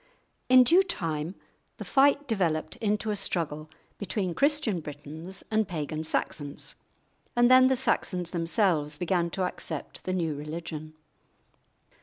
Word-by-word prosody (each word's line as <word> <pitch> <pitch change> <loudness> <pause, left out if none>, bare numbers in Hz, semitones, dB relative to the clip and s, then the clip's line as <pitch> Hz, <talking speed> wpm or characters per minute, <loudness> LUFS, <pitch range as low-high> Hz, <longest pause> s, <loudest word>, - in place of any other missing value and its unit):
In 255 0 +8
due 340 +9 +6
time 165 - -3 0.4
the - - -7
fight 285 +1 +3
developed 175 -9 0
into 210 0 -1
a - - -1
struggle 155 -5 -2 0.3
between 195 -3 -2
Christian 280 - +2
Britons 155 +5 -7
and 220 -2 +2
pagan 155 -3 -4
Saxons, 145 -2 -2 0.6
and 240 +1 +5
then 255 0 +8
the 265 - +3
Saxons 180 -8 -1
themselves 165 -4 +1
began 175 0 0
to 185 +2 -2
accept 165 -4 -4
the 185 - -1
new 165 -4 0
religion. 155 +1 -6
175 Hz, 130 wpm, -28 LUFS, 155-220 Hz, 0.6 s, In